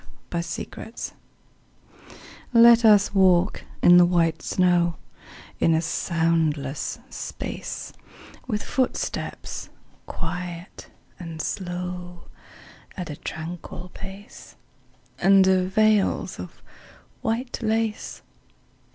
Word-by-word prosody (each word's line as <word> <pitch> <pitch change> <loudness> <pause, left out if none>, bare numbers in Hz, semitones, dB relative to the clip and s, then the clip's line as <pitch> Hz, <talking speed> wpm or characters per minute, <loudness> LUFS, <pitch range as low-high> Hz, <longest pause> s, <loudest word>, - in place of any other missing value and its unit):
VELVET 170 0 -3
SHOES 225 - -7 1.4
Let 235 0 +8
us 210 -3 +6
walk 190 -1 +3 0.2
in 175 0 +8
the 175 - +8
white 170 -2 +2
snow 175 -2 +2 0.6
In 165 - +4
a - - +3
soundless 160 -4 0
space; - - -6 0.5
With 210 -4 -2
footsteps 260 -2 -3 0.4
quiet 175 +1 -6 0.3
and 165 -3 -7
slow, 180 0 -4 0.7
At 180 -4 -4
a - - -5
tranquil 175 +3 -7
pace, 195 +3 -11 0.7
Under 190 -1 +5
veils 215 +1 +2
of - - -9 0.6
white 240 +3 -2
lace. 225 -1 -1
180 Hz, 85 wpm, -24 LUFS, 170-205 Hz, 1.4 s, Let